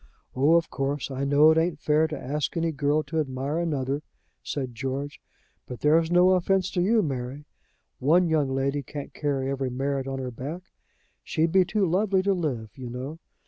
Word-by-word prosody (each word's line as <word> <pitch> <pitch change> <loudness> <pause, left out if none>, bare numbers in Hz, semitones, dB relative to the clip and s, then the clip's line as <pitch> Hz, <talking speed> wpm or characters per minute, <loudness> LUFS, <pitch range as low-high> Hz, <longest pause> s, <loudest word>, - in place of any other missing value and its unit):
"Oh, 145 +6 +4
of 170 -1 +1
course, 140 0 -2
I 135 +1 -2
know 145 +3 +6
it 160 - +3
ain't 165 -1 0
fair 155 +2 +2
to 155 -1 -5
ask 150 +5 -3
any 165 0 +1
girl 145 +1 +1
to 160 +1 -2
admire 140 +2 -2
another," 145 -4 -1 0.4
said 130 -4 -4
George. 135 +4 -4 0.5
"But 125 - -8
there's 160 +2 +4
no 180 +1 +5
offense 185 0 +2
to 175 - 0
you, 215 +4 +3
Mary. 135 0 -4 0.5
One 170 +7 +4
young 155 -4 +1
lady 135 +2 0
can't 140 +1 -8
carry 140 -3 -1
every 135 -1 -2
merit 135 +1 -2
on 135 0 -3
her 130 -1 -4
back. 145 +10 -6 0.6
She'd 160 0 0
be 190 0 +5
too 200 +2 +1
lovely 190 +2 +2
to 200 0 +2
live, 130 - -3
you 125 -2 -7
know. 130 +6 -6
145 Hz, 185 wpm, -26 LUFS, 135-165 Hz, 0.6 s, know